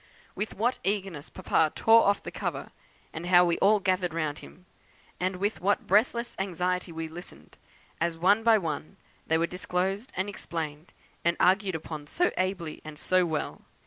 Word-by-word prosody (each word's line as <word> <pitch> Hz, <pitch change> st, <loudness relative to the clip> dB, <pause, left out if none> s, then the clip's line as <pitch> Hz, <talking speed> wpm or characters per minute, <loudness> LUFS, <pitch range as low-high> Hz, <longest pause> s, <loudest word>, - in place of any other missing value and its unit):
With 215 Hz, -, -4 dB
what 240 Hz, +5 st, 0 dB
eagerness 190 Hz, -6 st, -2 dB
Papa 160 Hz, -4 st, +1 dB
tore 225 Hz, +1 st, +6 dB
off 200 Hz, 0 st, +2 dB
the -, -, -6 dB
cover, -, -, -4 dB, 0.4 s
and 165 Hz, +2 st, -5 dB
how 180 Hz, 0 st, +6 dB
we 170 Hz, -1 st, +1 dB
all 210 Hz, +2 st, +5 dB
gathered 185 Hz, -3 st, 0 dB
round 155 Hz, -2 st, -2 dB
him, 180 Hz, -, -14 dB, 0.5 s
and 185 Hz, +1 st, 0 dB
with 200 Hz, +4 st, -2 dB
what 200 Hz, +3 st, +1 dB
breathless 235 Hz, +4 st, +2 dB
anxiety 180 Hz, -1 st, -1 dB
we 165 Hz, 0 st, -4 dB
listened, 170 Hz, +3 st, -12 dB, 0.4 s
as 170 Hz, -1 st, 0 dB
one 195 Hz, +6 st, +4 dB
by 225 Hz, -1 st, +5 dB
one 155 Hz, -5 st, -4 dB, 0.3 s
they 160 Hz, -, +3 dB
were 165 Hz, -, +2 dB
disclosed, 185 Hz, +5 st, -2 dB
and 190 Hz, +2 st, 0 dB
explained, 160 Hz, -5 st, -5 dB, 0.3 s
and 170 Hz, +1 st, +2 dB
argued 190 Hz, 0 st, +3 dB
upon 155 Hz, -2 st, -6 dB
so 355 Hz, -, +1 dB
ably, 185 Hz, -4 st, -2 dB
and 155 Hz, -1 st, -9 dB
so 185 Hz, +3 st, +2 dB
well! 155 Hz, -2 st, -3 dB
180 Hz, 170 wpm, -28 LUFS, 165-200 Hz, 0.5 s, tore